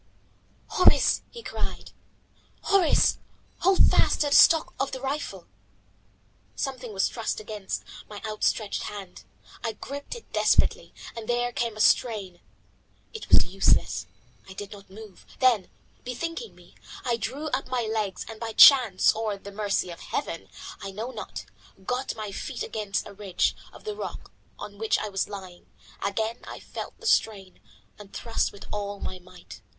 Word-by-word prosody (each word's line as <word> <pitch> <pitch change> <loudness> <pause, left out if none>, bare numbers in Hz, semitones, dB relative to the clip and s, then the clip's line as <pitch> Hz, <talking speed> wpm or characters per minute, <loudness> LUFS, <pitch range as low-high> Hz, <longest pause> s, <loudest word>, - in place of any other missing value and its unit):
"Horace," 365 - +5
he 470 - -10
cried, - - -5 0.7
"Horace, 390 -5 +4 0.4
hold 380 +1 +5
fast - - +3
to 295 - +2
the 285 - +4
stock 325 -1 +7
of 275 - -1
the 260 - -3
rifle." 275 +3 -4 1.1
Something 255 -4 -4
was 195 -2 +2
thrust 230 -2 -3
against 210 -2 -5 0.3
my 205 -1 -7
outstretched 215 0 0
hand. 195 -3 -8 0.4
I 225 -2 -1
gripped 285 - -7
it 470 - -13
despairingly, - - +3 0.2
and 225 -2 -7
there 240 0 +1
came 235 -3 -2
a - - 0
strain. 210 -5 +2 0.7
It 445 - -8
was - - +7
useless, 175 - +2 0.4
I - - -8
did 200 +1 -7
not 200 -2 -12
move. 210 0 -12 0.2
Then, 245 -8 +4 0.3
bethinking 330 - -5
me, - - -19 0.3
I 240 -2 +2
drew 280 +7 -3
up 265 -1 -1
my 250 -2 0
legs 215 -4 -2
and 225 -1 -8
by 225 -1 -4
chance 240 -7 +8
or 220 -2 -2
the 200 +1 -10
mercy 200 -3 -1
of 170 - -9
Heaven, 165 - -4 0.3
I 195 - -5
know 220 +6 -5
not, - - -7 0.4
got 250 +4 -2
my 215 -2 -5
feet 245 +5 -4
against 210 -2 -2
a 205 - -10
ridge 195 -2 0 0.2
of - - -14
the 430 -1 -4
rock - - -7 0.3
on 205 -1 -9
which 220 0 +2
I 215 - -3
was 195 -1 -1
lying. 190 -3 -9 0.4
Again 220 +3 -1
I - - -8
felt - - -8
the 460 - -12
strain, 200 - +1 0.4
and 205 -1 -12
thrust 230 -1 -1
with 200 - -12
all 205 -1 -3
my 185 - -5
might. 180 - -13
215 Hz, 160 wpm, -27 LUFS, 200-255 Hz, 1.1 s, chance